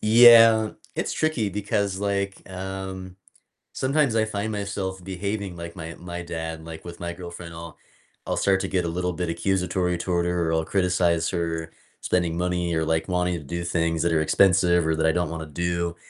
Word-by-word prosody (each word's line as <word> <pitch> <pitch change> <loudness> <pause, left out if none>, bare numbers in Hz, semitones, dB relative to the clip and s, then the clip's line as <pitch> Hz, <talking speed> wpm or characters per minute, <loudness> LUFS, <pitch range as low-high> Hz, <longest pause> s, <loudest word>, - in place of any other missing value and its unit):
Yeah, 115 -1 +8 0.2
it's - - -2
tricky 155 -10 0
because, 100 0 -1
like, 100 -1 -2
um, 95 0 -6 0.6
sometimes 135 -2 +1
I 110 -1 +3
find 110 0 -3
myself 100 -3 -4
behaving 95 0 -4
like 85 0 -7
my 80 -3 -7
my 90 0 -7
dad, 80 -1 -5
like, 80 0 -9
with 85 -1 -9
my 85 0 -4
girlfriend, 85 -1 -9
I'll 85 0 -9 0.5
I'll - - -2
start 95 -1 +3
to - - -2
get 90 -2 0
a - - -1
little 90 +2 -1
bit 90 +1 -3
accusatory 90 0 0
toward 85 0 0
her 85 -2 0
or - - 0
I'll 80 0 +1
criticize 90 -3 +1
her 85 -2 -2 0.3
spending 85 -2 0
money 90 -1 0
or, 80 0 0
like, 80 0 0
wanting 90 -1 0
to - - -11
do 85 +5 -4
things 85 -1 0
that 85 -1 +1
are 80 - +3
expensive 90 0 +4
or 80 - +2
that 80 0 0
I 80 - +5
don't 90 -1 0
want 80 -1 -5
to - - -9
do. 85 -1 -1
90 Hz, 195 wpm, -25 LUFS, 85-95 Hz, 0.6 s, Yeah